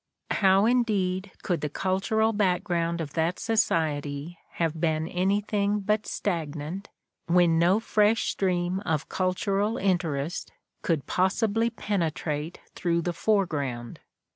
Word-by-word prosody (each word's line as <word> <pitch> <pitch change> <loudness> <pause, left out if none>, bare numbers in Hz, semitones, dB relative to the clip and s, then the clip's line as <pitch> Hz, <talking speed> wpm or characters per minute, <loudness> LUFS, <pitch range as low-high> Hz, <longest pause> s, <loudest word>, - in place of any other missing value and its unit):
How, 195 0 +4
indeed, 205 -6 +1
could 175 -5 -1
the 150 - -2
cultural 200 +7 +1
background 175 -4 0
of 145 -3 -6
that 165 +2 0
society 160 -7 -1
have 165 -1 -1
been 160 -1 +1
anything 200 +3 0
but 210 +1 0
stagnant 165 0 -3 0.4
when 170 -1 +4
no 180 +5 +4
fresh 220 0 +2
stream 180 -1 0
of 160 -4 -1
cultural 195 +3 0
interest 175 -5 -1 0.3
could 160 -5 0
possibly 220 +5 +1
penetrate 165 -7 -2
through 170 -1 0
the 175 - -1
foreground? 145 - -1
180 Hz, 115 wpm, -27 LUFS, 165-205 Hz, 0.4 s, How